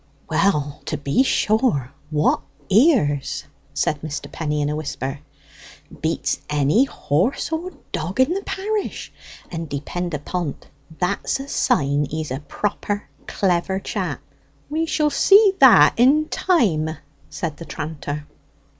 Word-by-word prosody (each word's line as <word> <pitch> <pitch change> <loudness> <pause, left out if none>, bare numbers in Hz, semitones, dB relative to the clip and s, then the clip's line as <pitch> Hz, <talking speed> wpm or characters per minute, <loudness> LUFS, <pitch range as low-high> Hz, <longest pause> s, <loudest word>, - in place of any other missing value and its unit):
"Well 150 -8 +1
to 150 - -2
be 145 - +1
sure, 215 - +1 0.2
what 150 0 +2 0.3
ears!" 200 - +3 0.3
said 150 -1 0
Mr. 150 -2 -5
Penny 150 -2 -2
in - - 0
a 150 - -1
whisper. 140 -2 -4 0.8
"Beats - - -1
any 150 - +3
horse 195 - -1
or 340 +3 -3 0.2
dog 180 +9 -3
in 260 +6 +4
the 390 - -2
parish, 410 +2 -3 0.4
and 165 -2 -5
depend 170 +4 -3
upon't, 150 +1 -4 0.3
that's 190 +8 -1
a 270 - -6
sign 145 - +1
he's 155 -2 -4
a 130 - -2
proper 205 +5 -3 0.2
clever 190 0 0
chap." - - -3 0.5
"We 320 +2 0
shall 300 -2 +1
see 400 +3 +6
that 265 -4 +8
in 285 +6 +4
time," 195 - +2 0.4
said 160 -4 -4
the 165 - -8
tranter. 150 -1 -5
175 Hz, 130 wpm, -22 LUFS, -, 0.8 s, that